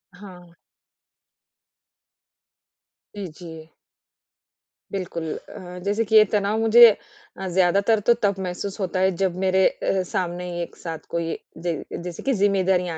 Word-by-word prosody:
हाँ। 180 -3 -13 2.6
जी, 200 -2 -5
जी। 160 -1 -11 1.2
बिल्कुल 170 -4 -4 0.2
अ, 180 0 -9
जैसे 205 +3 +1
कि 220 +1 0
ये 215 - +9
तनाव 210 +2 +1
मुझे 225 0 +8 0.5
ज़्यादातर 195 +5 +3
तो 240 - +7
तब 200 -1 +2
महसूस 190 +3 -5
होता 185 -1 -2
है 190 +1 +3
जब 185 -2 +1
मेरे 190 0 +3
अ, 190 -1 -1
सामने 180 -1 -2
एक 170 - -7
साथ 165 -2 -7
कोई 170 -1 -2 0.3
जै 170 - +1 0.3
जैसे 175 - -7
की 270 - +1
जिम्मेदारियाँ 185 -3 +2
185 Hz, 125 wpm, -23 LUFS, 175-200 Hz, 2.6 s, ये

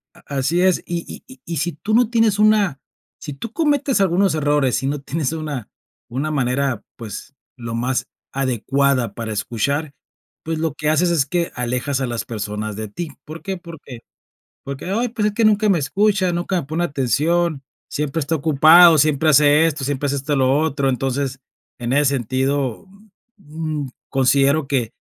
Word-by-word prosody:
A - - -18 0.2
así 160 +7 +1
es, 185 -1 +3
y 170 -1 -3
y - - -10
y 260 - -15
y 170 -2 -4
si 170 +3 -1
tú 210 +9 -4
no 235 -1 +4
tienes 225 -3 +2
una 210 -9 +3 0.4
si 145 - -7
tú 220 +11 -7
cometes 285 -5 +1
algunos 190 0 +2
errores 145 -4 +1
y - - 0
no 145 0 -2
tienes 155 +1 -2
una 150 -8 -5 0.4
una 135 +6 -2
manera, 130 -3 0
pues, 115 +4 -8 0.2
lo 115 -1 -6
más 125 +2 -1 0.2
adecuada 130 -2 0
para 110 -2 -4
escuchar, 140 +8 -2 0.5
pues, 160 0 -3
lo 160 -3 -1
que 150 +1 -1
haces 170 +3 +3
es 160 -5 +2
que 170 +3 -1
alejas 125 +3 -2
a - - 0
las 120 -1 -3
personas 105 -1 -4
de 110 +1 -5
ti, 160 +10 -6 0.2
¿por 155 +2 -9
qué? 190 -1 -4
Porque 160 -9 -11 0.6
porque: 140 0 -6
"Ay, 235 +5 0
pues, 215 -2 0
es 210 - -5
que 230 - +1
nunca 215 0 +3
me 190 - +4
escucha, 190 +5 +1
nunca 175 +2 -1
me - - -9
pone 160 +4 -1
atención, 150 +3 0 0.3
siempre 150 +2 -2
está 155 +3 -1
ocupado, 160 +3 +7
siempre 155 +1 +3
hace 150 +2 +5
esto, 150 -4 -2
siempre 145 +1 -1
hace 140 - -1
este, 140 +1 -1
lo 130 +1 +3
otro". 140 -3 0
Entonces, 135 +1 -2 0.4
en 120 0 -3
ese 145 +1 +3
sentido, 130 - -1 0.5
mm 155 -3 -5
mm, - - -7 0.2
considero 135 +2 +3
que 130 -5 -1
145 Hz, 180 wpm, -20 LUFS, 130-170 Hz, 0.6 s, ocupado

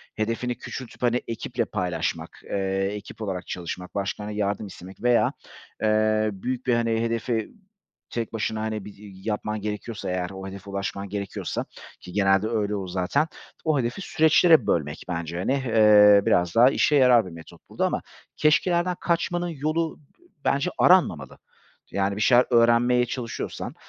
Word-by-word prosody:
hedefini 115 +2 -2
küçültüp 130 -1 -8
hani 125 0 +2
ekiple 115 +1 -3
paylaşmak, 90 -5 -3
eee, 95 0 -1
ekip 105 +2 -10
olarak 95 -4 -4
çalışmak, 90 +1 -6
başkalarından 105 +1 -3
yardım 100 0 -1
istemek 95 +2 -12
veya, 120 -1 +3 0.5
eee, 110 0 +2
büyük 125 +6 -4
bir 125 - +2
hani 115 -1 +1
hedefi 115 -1 -1 0.6
tek 115 -1 -4
başına 110 0 -2
hani 110 -2 -3
bir 105 - -9
y 100 0 -13
yapman 105 -1 -3
gerekiyorsa 105 0 -5
eğer, 90 -1 -2
o 95 0 -8
hedefe 100 +1 -9
ulaşman 100 0 -4
gerekiyorsa 100 -1 -4 0.3
ki 90 - -11
genelde 95 +1 +3
öyle 105 -2 -1
olur 95 -2 -4
zaten, 90 - 0 0.4
o 155 -3 +2
hedefi 120 +8 -2
süreçlere 160 -1 +4
bölmek 75 -2 -1
bence 85 0 -3
hani, 95 +9 0
eee, 105 -6 +6
biraz 90 -1 +2
daha 120 +3 +7
işe 150 +1 +2
yarar 125 -5 +5
bir 90 - -9
metot 80 -1 -14
burada - - -1
ama - - -1 0.4
keşkelerden 175 +3 +2
kaçmanın 175 +1 0
yolu 155 +2 -2
d 150 - -29 0.2
bence 140 +6 +1
aranmamalı 85 - +3 0.5
yani 100 0 0
bir 105 - -4
şeyler 125 +2 +5
öğrenmeye 120 +1 +4
çalışıyorsan... 120 -1 -5
110 Hz, 155 wpm, -25 LUFS, 100-125 Hz, 0.6 s, daha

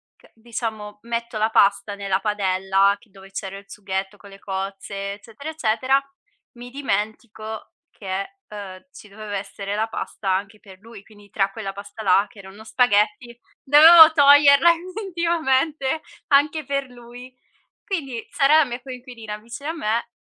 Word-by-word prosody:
che - - -24
diciamo 220 -2 -6
metto 235 -1 -4
la 215 +1 +1
pasta 200 -1 +2
nella 195 -1 -1
padella 195 -1 +1
che 225 - -24
dove 195 0 -16
c'era 195 0 -6
il 200 - -13
sughetto 195 0 -5
con 200 - -15
le 195 0 -14
cozze, 195 +1 -5
eccetera, 225 +8 -10
eccetera, 260 -2 +1 0.6
mi 245 +1 -10
dimentico 220 -3 -4 0.2
che, 195 - -6
uhm, 200 0 -9
ci 215 - -14
doveva 205 0 -6
essere 200 +1 -6
la 220 +1 0
pasta 210 -2 -5
anche 200 +3 -2
per 190 -3 -16
lui, 220 -1 -14
quindi 205 -1 -19
tra 195 0 0
quella 195 -2 -6
pasta 205 +2 -9
là 195 +1 +4
che 205 - -18
erano 195 +2 -12
spaghetti, 225 0 +1 0.2
dovevo 320 +3 +9
toglierla 285 +1 +7
effettivamente 335 -6 -1 0.3
anche 295 +1 +2
per 275 0 -2
lui. 245 +1 -13 0.5
Quindi, 275 - -4
Sara, 300 +1 +4
la 315 - +5
mia 245 -2 -6
coinquilina 245 -4 -8
vicino 235 +7 -9
a - - -2
me, 230 -8 -2
220 Hz, 150 wpm, -22 LUFS, 200-270 Hz, 0.6 s, dovevo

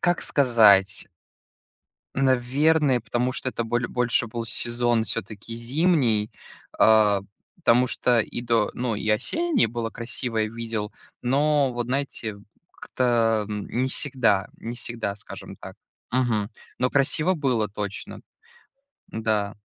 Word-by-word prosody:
Как 175 0 +1
сказать. 110 -7 +4 1.1
Наверное, 135 +2 +2
потому 120 +3 -1
что 130 - -2
это 120 - -3
боле 120 +2 -1
больше 120 -1 +1
был 115 +1 -5
сезон 120 0 +1
всё-таки 110 +1 -5
зимний. 120 - +1 0.5
А, 105 -2 +5 0.4
потому 125 +2 +3
что 125 -1 +1
и 115 - -4
до 115 -3 +1
ну, 120 -2 -2
и 110 - -3
осеннее 290 - +2
было 115 0 -4
красивое, 115 -2 -3
видел, 115 -2 -4 0.3
но 140 +1 +2
вот, 120 -1 -3
знаете, 125 -5 -3 0.4
как-то, 115 -3 +1
м 105 -1 -4
не 130 +2 -1
всегда 125 -8 +1
не 115 +1 -6
всегда, 120 -4 -4
скажем - - -10
так. - - -11 0.3
Мгм. 115 -4 0 0.3
Но 125 0 +1
красиво 155 +6 +2
было 125 -8 0
точно. 100 0 -6 0.9
Да. 110 -2 -1
120 Hz, 120 wpm, -24 LUFS, 110-130 Hz, 1.1 s, А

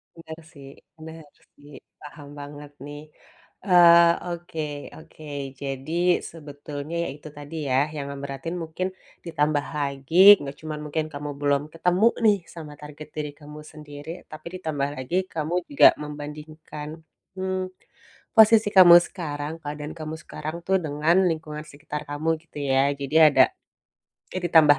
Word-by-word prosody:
Bener 165 -1 -10
sih 140 -2 -13 0.3
bener 160 0 -11 0.3
sih, 145 0 -16 0.3
paham 145 -1 -11
banget 145 0 -9 0.2
nih. 145 0 -8 0.7
Eee, 170 -2 +8 0.3
oke 170 -1 -7 0.4
oke, 160 0 -15 0.4
jadi 135 +1 -5 0.4
sebetulnya 145 0 -8
ya, - - -3
itu 150 +1 -11
tadi 145 +2 -9
ya, 130 - +2 0.2
yang 140 -1 -4
ngeberatin 140 +4 -6
mungkin 165 +4 -3 0.4
ditambah 150 -3 0
lagi 140 +2 -4 0.2
nggak 140 -1 -6
cuma 155 -1 -5
mungkin 155 +1 -2
kamu 145 +1 -5
belum 145 0 +2
ketemu 180 +6 +2 0.2
nih, 210 -2 +5 0.2
sama 150 -3 -9
target 150 0 -10
diri 150 -1 -4
kamu 150 +1 -11
sendiri, 145 0 -11 0.2
tapi 155 +1 -9
ditambah 145 -4 -2
lagi 130 +8 -4 0.2
kamu 160 +2 -2
juga 140 - +7 0.2
membandingkan, 150 +1 -8 0.5
mmm, 185 0 -2 0.8
posisi 220 -1 +6
kamu 175 -2 +10
sekarang, 150 -4 -5
keadaan 150 0 -6
kamu 155 0 -5
sekarang 155 +2 -6
tuh 190 0 +3
dengan 150 +4 +1
lingkungan 155 -2 -4
sekitar 150 +1 -7
kamu, 150 +3 -2
gitu 165 - -15
ya. 135 +1 +3
Jadi 140 +3 -5
ada, - - +6 0.9
eh, 185 - -2
ditambah 150 -4 +6
150 Hz, 140 wpm, -24 LUFS, 145-165 Hz, 0.9 s, kamu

